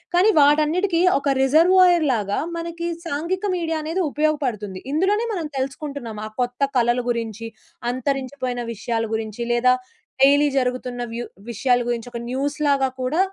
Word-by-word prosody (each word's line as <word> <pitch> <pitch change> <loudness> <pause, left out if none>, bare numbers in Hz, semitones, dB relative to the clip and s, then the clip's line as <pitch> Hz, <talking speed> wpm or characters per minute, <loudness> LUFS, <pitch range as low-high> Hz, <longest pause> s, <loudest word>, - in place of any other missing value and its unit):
కానీ 380 +5 +5
వాటన్నిటికీ 310 +5 +3 0.2
ఒక 275 -1 0
రిజర్వాయర్‌లాగా 315 - +4 0.2
మనకి 335 0 -4 0.2
సాంఘిక 335 +5 -2
మీడియా 325 -2 -1
అనేది 325 +5 -1
ఉపయోగపడుతుంది. 255 -11 -1
ఇందులోనే 405 +8 +1
మనం 335 - -3
తెలుసుకుంటున్నాం. 270 -4 -5
ఆ - - -9
కొత్త 245 +2 -3 0.2
కళలు 240 +1 +2
గురించి 230 -1 -4 0.5
అంతరించిపోయిన 255 -1 -3
విషయాల 225 +1 -2
గురించి 220 0 -5
లేదా 250 +1 +4 0.5
డైలీ 285 +2 +6
జరుగుతున్న 250 -1 -1
వ్యు 240 +1 -4 0.2
విషయాల 245 +2 +1
గురించి 240 -1 -2
ఒక 235 - -5
న్యూస్‌లాగా 280 +1 +1
కూడా 260 +7 0
275 Hz, 125 wpm, -22 LUFS, 240-315 Hz, 0.5 s, డైలీ